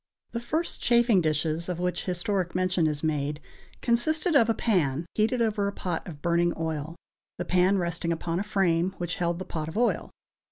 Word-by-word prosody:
The 235 - -2
first 310 +8 -2
chafing 235 -5 +4
dishes 160 +2 0
of 175 -1 -3
which 180 0 -1
historic 180 0 -1
mention 185 -2 +2
is 150 0 -2
made 150 -1 -1 0.4
consisted 310 +8 +2
of 230 -4 +5
a 225 - +3
pan 165 - +1
heated 230 +3 +2
over 210 -2 0
a - - -1
pot 180 -3 -4
of 150 -5 -9
burning 170 0 +2
oil, 160 0 -3 0.4
the 175 - -3
pan 185 +2 +3
resting 170 -1 -1
upon 165 +1 -2
a - - -1
frame 190 -3 +1
which 175 -1 -3
held 170 -1 0
the 185 - -6
pot 155 -2 -4
of 160 - -6
oil. 240 +1 +1
180 Hz, 190 wpm, -27 LUFS, 165-210 Hz, 0.4 s, of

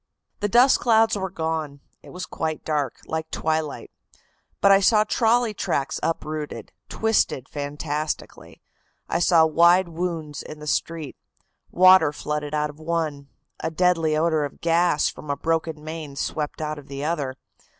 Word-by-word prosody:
"The 205 - -1
dust 245 +6 +5
clouds 225 -2 +3
were 190 -1 -3
gone. 160 -4 -3 0.2
It - - -14
was 180 0 -6
quite 160 -1 -4
dark, 145 -5 -1
like 160 0 -4
twilight. 155 -2 -2 0.7
But 200 - +5
I 195 - +7
saw 210 +2 +4
trolley 230 +1 +2
tracks 140 -8 -2
uprooted, 155 -2 -4 0.2
twisted 220 - 0
fantastically. 150 +1 -5 0.4
I - - 0
saw 170 -2 +5
wide 170 +3 +4
wounds 165 -3 -4
in 155 - -9
the 150 - -10
street. 155 -1 -2 0.5
Water 185 -4 +6
flooded 150 0 -4
out 150 0 0
of 145 - -20
one. 155 -3 -2 0.3
A - - -2
deadly 165 -2 +2
odor 160 -1 +2
of 145 - -6
gas 170 -2 +2
from 150 - -7
a 140 - -1
broken 160 -2 -2
main 155 -2 -7
swept 150 +2 -3
out 155 0 -3
of 140 - -15
the 140 0 -6
other. 145 -5 -2
160 Hz, 150 wpm, -24 LUFS, 150-175 Hz, 0.7 s, I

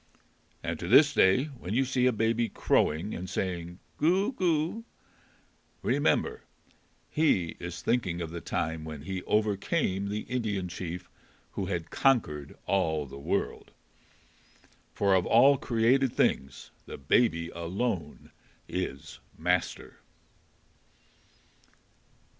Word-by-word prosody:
And 85 -1 -3
to 85 - -5
this 145 - +6
day 95 +4 +4
when 120 -9 -6
you 135 +2 +3
see 125 -1 +2
a - - +4
baby 115 +1 +1
crowing 85 +2 +1
and 90 +1 -5
saying 90 -3 -3 0.2
"Goo, 190 - +2
goo!" 175 - 0 1.0
remember 445 0 +1 0.7
he 100 - +1
is 85 0 -6
thinking 95 -8 0
of 85 -2 -4
the 85 0 -6
time 80 -1 -2
when 75 -2 -7
he 95 +1 -4
overcame 105 - 0
the 105 +1 -2
Indian 105 -7 -2
chief 90 0 -6 0.4
who 95 - -3
had 85 -3 -3
conquered 75 - +1
all 80 -6 +1
the 70 0 -10
world. 70 - -2 1.2
For 100 -1 +2
of 90 -2 +2
all 135 +4 +6
created 125 +3 +2
things 65 - 0 0.2
the - - -7
Baby 85 - +2
alone 85 -1 -4 0.4
is 90 -7 -5 0.2
master. 90 +2 -1
95 Hz, 115 wpm, -29 LUFS, 85-125 Hz, 1.2 s, this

